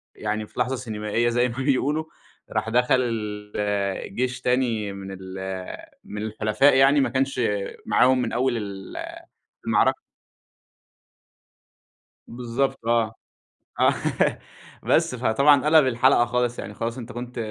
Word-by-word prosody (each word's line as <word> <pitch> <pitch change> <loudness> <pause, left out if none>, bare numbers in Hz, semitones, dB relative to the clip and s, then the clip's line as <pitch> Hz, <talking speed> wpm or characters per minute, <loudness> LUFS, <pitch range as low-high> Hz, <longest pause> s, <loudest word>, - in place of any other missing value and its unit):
يعني 105 0 -3
في - - -11
لحظة 130 +2 +1
سينمائية 115 -1 -1
زي 120 +1 +1
ما 120 - -8
بيقولوا 140 +3 +1 0.5
راح 115 - -1
دخل 125 +2 +3 0.6
الجيش 105 +4 -2
تاني 120 -5 0
من 100 0 -8
ال 95 0 -9 0.7
من 105 - -7
الحُلفاء 110 +5 +2
يعني 135 +2 +5
ما 130 - +1
كانش 130 0 0 0.4
معاهم 130 0 +4
من 120 - -2
أول 125 0 +1
ال 100 -3 -7 0.7
المعركة. - - +3 2.3
بالضبط 120 +3 -2
آه، 115 -2 +1 0.7
آه، - - +1 0.4
بس - - +2
فطبعًا 130 +4 +4
قَلب 155 -3 +5
الحلقة 125 0 +4
خالص، 120 0 -1
يعني 105 - -6
خلاص 115 +3 -4
أنت 120 0 -7
كنت 120 +1 -7
120 Hz, 120 wpm, -24 LUFS, 110-130 Hz, 2.3 s, يعني